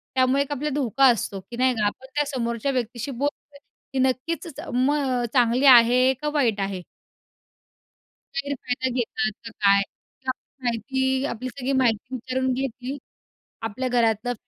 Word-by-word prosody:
त्यामुळे 260 +2 +3
एक 285 - -12
आपल्याला 290 0 -2
धोका 270 -1 +2
असतो 210 -5 +1
की 235 - -6
नाही 255 0 +3
का 215 -2 0
आपण 205 +5 -3
त्या 295 - +2
समोरच्या 235 +2 -1
व्यक्तीशी 245 0 -3
बोलतो 285 +2 -4 0.4
की 265 - 0
नक्कीच 265 +6 0 0.3
मग 260 -1 +1
चांगली 245 +1 +3
आहे 250 +1 +7
का 300 - 0
वाईट 235 -9 +2
आहे? 195 -2 -3 1.5
गैरफायदा 260 -2 -2
घेतात 220 -2 -1
का 230 - -7
काय 200 0 +6
किंवा 260 +6 -7 0.3
माहिती 245 +3 -1 0.3
आपली 250 +3 -5
सगळी 265 +1 -3
माहिती 235 +2 0
विचारून 260 +1 -1
घेतील 260 +1 -4 0.7
आपल्या 255 +5 -3
घरातलं. 235 0 +1
255 Hz, 140 wpm, -24 LUFS, 235-270 Hz, 1.5 s, आहे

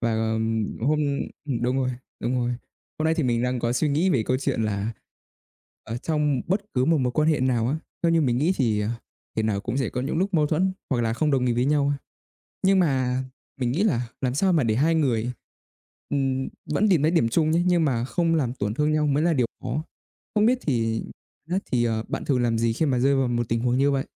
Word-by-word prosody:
và, 115 -1 0
ờ, 110 0 0 0.5
hôm 150 +6 +2 0.6
đúng 125 +2 +1
rồi, 130 -1 +1 0.3
đúng 120 - -1
rồi. 120 -1 0 0.5
Hôm 155 - -1
nay 160 - +3
thì 160 - 0
mình 120 -2 +1
đang 125 0 0
có 120 0 0
suy 145 +5 +1
nghĩ 160 +7 +2
về 130 -9 +2
câu 130 +4 0
chuyện 120 -4 -1
là 105 +1 -1 0.9
ở 115 - -5
trong 150 -2 0
bất 190 +4 +1
cứ 125 -1 +2
một 160 +2 +3
mối 125 -2 0
quan 155 +3 +2
hệ 155 -4 +2
nào 120 -3 +1
á, 145 - 0 0.3
theo 170 -1 +3
như 165 - +4
mình 125 -4 +1
nghĩ 160 +7 +2
thì, 110 -6 +1
ờ, 105 - -1 0.5
thể 110 - +1
nào 105 -2 0
cũng 120 +4 -3
sẽ 130 -5 0
có 125 - -3
những 140 +5 -2
lúc 190 +2 0
mâu 150 -3 +4
thuẫn, 180 +5 +1 0.2
hoặc 125 -3 +1
là 115 -1 0
không 150 +6 0
đồng 130 -3 +2
ý 120 - +2
với 120 +1 +1
nhau 145 0 +2
ha, 145 -1 -1 0.7
nhưng 190 0 +4
mà 130 -6 +1 0.4
mình 125 -2 0
nghĩ 165 +10 +1
là 125 - +1
làm 130 -1 0
sao 185 +5 +2
mà 155 -5 +3
để 110 -2 +1
hai 160 +7 +3
người, 125 -6 +1 0.8
ừm, 135 -2 0 0.2
vẫn 195 +8 +1
tìm 175 -7 +4
thấy 155 +2 +3
điểm 165 -10 +2
chung 155 +5 +2
nhé, 165 +2 +3
nhưng 175 -3 +3
mà 120 -5 0
không 165 +4 +1
làm 130 -6 0
tổn 105 -5 -2
thương 150 +5 +1
nhau 155 -1 +2
mới 145 +2 +2
là 170 0 +3
điều 125 -5 +1 0.2
khó. 130 +5 -2 0.5
Không 210 0 +4
biết 250 +3 +4
thì 115 -5 0 0.5
biết 180 - +1
thì, 120 -2 +2
à, 110 -1 -1
bạn - - -4
thường 130 -4 +1
làm 115 -1 +1
gì 115 0 +1
khi 160 - 0
mà 130 -4 +1
rơi 140 +3 +3
vào 135 -1 +2
một 120 -1 -1
tình 115 - +1
huống 125 +1 +1
như 140 +2 +3
vậy? 135 -1 0
130 Hz, 250 wpm, -25 LUFS, 120-155 Hz, 0.9 s, như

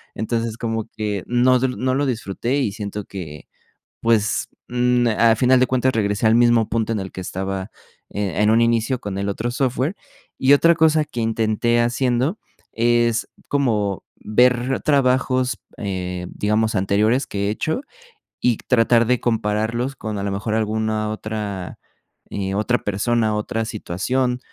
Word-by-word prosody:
entonces 115 +1 -2
como 115 -2 -3
que 105 -3 -2
no 125 +1 +3
no 130 0 0
lo 145 +2 +1
disfruté 120 +1 -2
y 110 -8 -1
siento 105 -1 -5
que, 80 -7 -8 0.5
pues, 110 -2 +1 0.2
mm, 125 0 +2
al 115 0 +5
final 125 +2 +4
de 130 - +4
cuentas, 130 0 +1
regresé 105 -1 0
al 110 - +5
mismo 120 -2 +4
punto 115 0 -1
en 110 - -1
el 95 -1 -7
que - - -6
estaba, 95 +2 -4 0.4
eh, 100 -4 -3
en 105 - +4
un 115 +1 +4
inicio 115 +2 +1
con 100 -1 -5
el 100 0 -2
otro 115 +4 -3
software, 130 +5 -1 0.4
y 130 +2 +4
otra 165 +4 +5
cosa 160 -1 +3
que 120 - -6
intenté 115 +1 +1
haciendo 125 - 0 0.3
es 120 0 +2 0.2
como 105 -9 0
ver 125 +3 +2
trabajos, 130 -2 +2 0.2
eh, 90 -4 -4
digamos 110 +2 0
anteriores 105 +6 +2
que 100 0 -2
he - - +1
hecho 155 - -2 0.6
y 120 -3 +2
tratar 115 -1 +3
de 125 0 +2
compararlos 115 +3 -1
con 110 -4 -5
a - - -3
lo 100 - -2
mejor, 100 +2 -2
alguna 110 0 -1
otra, 105 -4 -5 0.5
eh, 95 -1 -3
otra 115 +4 +1
persona, 110 +2 0
otra 110 +1 -2
situación 125 +5 -1
115 Hz, 155 wpm, -21 LUFS, 105-125 Hz, 0.6 s, al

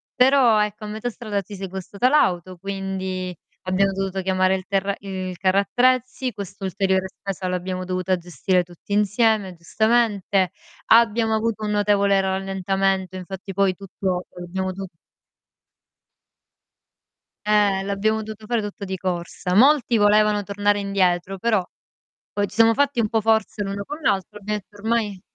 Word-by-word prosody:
però, 250 -4 +5
ecco, 210 +1 -5
a - - -6
metà 220 +3 -4
strada 215 -4 -3
ci 200 +2 -10
si 195 - -8
è - - -2
guastata 190 +5 -2
l'auto, 185 - +2
quindi, 190 -1 -4 0.3
abbiamo 190 +1 +2
dovuto 195 0 -2
chiamare 185 0 +2
il 185 - -6
terra 195 0 0
il 190 -2 -5
carro 190 +1 +2
attrezzi, 255 +3 +1
quest'ulteriore 190 -1 -2
spesa 195 -2 -5
l'abbiamo 185 0 -3
dovuta 185 0 0
gestire 180 +1 0
tutti 175 +3 -9
insieme, 210 -2 +2
giustamente. 205 0 +1 0.4
Abbiamo 225 0 +4
avuto 220 -1 -1
un 210 - -1
notevole 200 -1 +3
rallentamento, 190 0 -1
infatti, 190 +1 -7
poi, 195 0 +2
tutto 185 -1 -3
l'abbiamo 185 +2 -3
do 195 +1 -6 2.6
Eh, 205 -2 +3
l'abbiamo 200 +3 0
dovuto 215 0 -9
fare 235 0 0
tutto 205 -1 -6
di 190 0 -4
corsa. 180 0 -3
Molti 260 0 +5
volevano 210 0 +4
tornare 205 +1 +1
indietro, 195 -1 0
però, 215 -3 +2 0.7
poi, 205 0 0
ci - - -13
siamo 225 0 +6
fatti 280 -2 +1
un 215 - 0
po' 225 - +2
forza 220 -1 +1
l'uno 200 +1 -4
con 295 +8 -7
l'altro, 200 - -1
ho - - -22
detto: 210 0 -5
"Ormai 210 -3 -1
200 Hz, 145 wpm, -23 LUFS, 190-215 Hz, 2.6 s, siamo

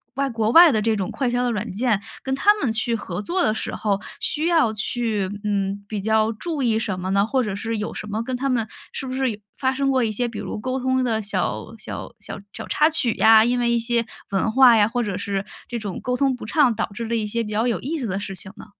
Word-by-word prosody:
外 275 +1 0
国 225 -3 0
外 335 +2 +9
的 215 - +1
这 225 +1 +1
种 195 -3 -2
快 265 -3 -1
销 245 +1 0
的 245 - +1
软 220 0 -3
件， 220 -2 +1 0.2
跟 265 - -2
他 410 +10 +5
们 280 - -1
去 225 +1 0
合 190 -3 -4
作 350 - 0
的 215 - +2
时 220 - -3
候， 200 -2 0 0.2
需 300 +2 0
要 325 -10 +3
去， 215 -2 -1
嗯， 200 -1 -1
比 215 - -3
较 220 +1 +2
注 295 +5 -3
意 225 -3 +2
什 200 -4 -2
么 185 +1 -4
呢？ 200 +1 +3
或 260 +2 +1
者 210 -4 -3
是 225 +3 -3
有 210 - -4
什 210 - -6
么 215 +2 -2
跟 255 +2 -3
他 275 +2 -1
们 240 -4 +1 0.3
是 - - -3
不 255 - -4
是 260 -1 0
有 210 - -7 0.2
发 260 -1 +1
生 275 +1 0
过 260 -2 +2
一 220 - 0
些 240 +3 -1
比 230 - -7
如 - - -5
沟 255 +4 -2
通 260 0 +1
的 225 -3 0
小 205 - -2
小 - - -7
小 - - -6
小 - - -7
插 305 +1 +3
曲 270 -8 0
呀， 220 0 +6
因 245 +1 +1
为 240 -1 +1
一 235 - +2
些 235 0 0 0.3
文 195 +3 +1
化 250 0 +7
呀， 210 -2 +5
或 245 +2 -1
者 205 -5 -2
是 200 -1 -2 0.2
这 240 -1 -3
种 200 -4 -5
沟 250 0 -1
通 270 -1 +2
不 245 - -9
畅， 250 0 +3
导 - - -2
致 230 +3 -4
了 230 +1 -1
一 220 -2 0
些 230 +3 -1
比 220 - -4
较 215 +2 +1
有 240 -2 0
意 315 +5 -3
思 260 - -3
的 195 -2 -2
事 195 -1 -5
情 190 - -6
呢？ - - -10
230 Hz, 290 characters per minute, -23 LUFS, 210-255 Hz, 0.3 s, 外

